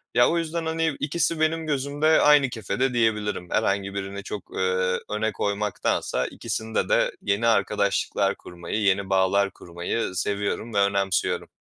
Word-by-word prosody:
Ya, 120 - +6
o 170 - +1
yüzden, 165 0 -2
hani, 160 -2 0
2'si 160 +2 0
benim 160 0 0
gözümde 145 +2 +2
aynı 145 -3 +5
kefede 120 +3 -1
diyebilirim. 105 -5 0
Herhangi 100 -2 0
birini 100 0 -5
çok, 105 - -6
eee, 95 0 +1
öne 110 +1 -1
koymaktansa 105 0 -1
2'sinde 110 0 -3
de - - +2
yeni 105 +3 +1
arkadaşlıklar 100 -2 +1
kurmayı, 85 +5 -5
yeni 100 -1 +1
bağlar 95 +1 +2
kurmayı 85 +5 -4
seviyorum 105 +3 -2
ve 100 - +2
önemsiyorum. 100 -1 +1
105 Hz, 140 wpm, -25 LUFS, 100-140 Hz, -, Ya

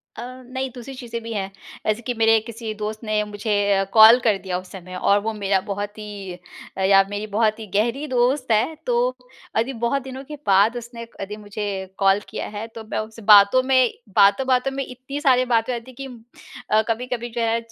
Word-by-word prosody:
अ, - - -7 0.2
नहीं 260 +1 -4
दूसरी 250 +2 -8
चीज़ें 235 -2 -6
भी 230 - -6
हैं। 195 -1 -3 0.4
ऐसे 215 +2 +1
कि 245 +1 -3
मेरे 225 -1 +4
किसी 225 -1 -6
दोस्त 215 +2 -5
ने 215 -1 0
मुझे 210 +1 -5 0.2
अ, 195 0 +2
कॉल 225 +2 +9
कर 215 -4 +3
दिया 185 -2 -3
उस 185 0 -14
समय 185 -1 -9
और 200 +2 +3
वो 220 +1 -2
मेरा 200 -2 +1
बहुत 205 +1 -4
ही 205 -3 -7 0.4
अ, - - -2
या 195 0 +6
मेरी 205 +1 -4
बहुत 220 0 +2
ही 215 - -8
गहरी 235 +8 +1
दोस्त 255 0 +1
है 235 +9 +2
तो 240 -1 +1 0.6
अदी 235 +4 0
बहुत 275 +3 0
दिनों 265 0 -8
के 300 +2 -8
बाद 200 +4 +4
उसने 235 -1 -8
अदी 200 +1 -5
मुझे 210 0 -6 0.3
कॉल 195 0 +4
किया - - -5
है 225 +2 -5
तो 225 - -7
मैं - - -1
उससे 220 +1 -7
बातों 205 +5 +7
में 260 -2 +3 0.2
बातों-बातों 250 +6 +4
में 275 0 -3
इतनी 260 +3 -7
सारी 255 -3 +4
बातें 235 0 +1
हो 240 - -2
जाती 255 +2 -15
कि - - -4 0.7
अ, 215 0 +5
कभी-कभी 240 +1 -2
जो - - +1
है 230 0 +1
225 Hz, 205 wpm, -22 LUFS, 205-250 Hz, 0.7 s, कॉल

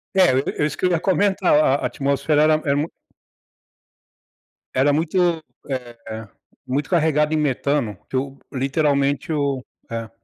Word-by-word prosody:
É, 185 -2 +6 0.3
é 150 - +4
isso 150 - -3
que - - -1
eu 180 - +3
ia 170 - +2
comentar, 195 0 +2
a 150 -2 +4
a - - -2
atmosfera 140 +2 +1
era 155 0 +5
era 140 - +2
mui 150 +3 -1 1.9
era 140 +3 +3
muito, 170 +1 +1 0.3
eh, 115 -4 -6 0.4
muito 135 +2 -2
carregado 155 -3 +2
em 155 - +2
metano, 140 -6 0
que - - -5
eu 135 +1 -2
literalmente 140 +3 0
eu 140 -4 -1 0.2
é. 115 -1 -4
145 Hz, 145 wpm, -22 LUFS, 135-160 Hz, 1.9 s, É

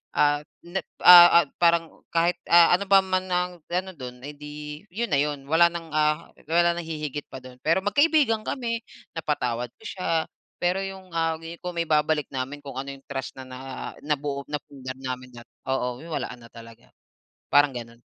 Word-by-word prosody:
ah, 145 0 +3 0.2
na 180 +3 -2 0.3
ah, 175 -1 +10
ah - - -11 0.2
parang 170 -1 +2
kahit, 170 +1 +3 0.2
ah, 170 +1 +7
ano 200 - -4
pa 195 -1 +8
man 185 0 -1
ang 180 0 0 0.2
ano 185 +1 -1
dun, 125 -2 -8
eh, 150 - -7
'di 150 +1 -8
'yun 235 +5 -2
na - - +4
'yun 145 -1 -1
wala 165 +3 +5
ng, 170 -1 -6
ah, 150 +1 +1 0.2
wala 170 0 +4
nang 175 - -3
hihigit 150 -2 -4
pa 130 - -7
dun. 130 -1 -11
Pero 165 +4 +3
magkaibigan 285 -3 +3
kami, 230 -3 -2 0.3
napatawad 125 -7 -2
ko - - -19
siya, 165 -4 -1 0.4
pero 180 +2 +2
'yung, 190 -1 -8
ah, 165 -1 +1 0.3
kung 180 0 -4
maibabalik 155 -2 +1
namin 135 +3 -4
kung 140 -2 -8
ano 140 +1 -5
'yung 135 - -13
trust 135 -1 -4
na 130 - -8
na 130 0 -9 0.5
nabuo, 145 -1 -2
napundar 135 -3 -6
namin 125 -1 -5
na 120 - -9 0.3
oo, 125 -2 -1
wala 160 - -3
na 115 -1 -14
talaga, 115 0 -13 0.7
parang 145 -1 +5
ganun. 115 0 -8
150 Hz, 180 wpm, -25 LUFS, 135-175 Hz, 0.7 s, ah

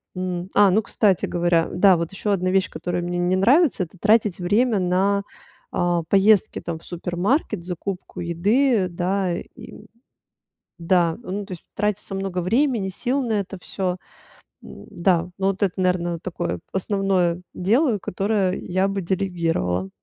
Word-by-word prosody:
м, 180 -1 -3
а, 205 -1 +6
ну, 215 +4 +3
кстати 195 -3 +1
говоря, 175 -1 +1
да, 185 0 +5
вот 165 0 -3
ещё 205 +2 -2
одна 185 -1 +1
вещь, 190 0 +2
которая 175 0 -3
мне 175 0 -3
не 175 +1 +1
нравится- 250 - +4
это 180 +2 -11
тратить 210 -2 +3
время 210 +5 +2
на, 190 +2 +1 0.5
а, 175 -1 0
поездки, 200 0 +3
там, 170 -1 -4
в - - -17
супермаркет, 180 - -1
закупку 180 +1 -5
еды, 200 +6 +2
да, 180 +1 -1
и 210 - -11 0.9
Да, 170 -1 +2
ну 205 -1 -4
то - - -9
есть, 175 - -8
тратится 210 -1 -2
много 195 -2 -2
времени, 225 +2 +1
сил 255 +8 -1
на 230 -3 -1
это 200 -1 -3
всё, 185 -1 -3 0.6
да, 175 -1 -1
ну, 195 0 +1
вот 195 +1 -2
это, 195 -3 +1
наверное, 175 -2 0
такое 175 0 -4
основное 190 -3 0
дело, 225 - +2
которое 195 0 -1
я 185 +2 0
бы 195 0 -2
делегировала. 170 - -1
185 Hz, 150 wpm, -23 LUFS, 175-205 Hz, 0.9 s, а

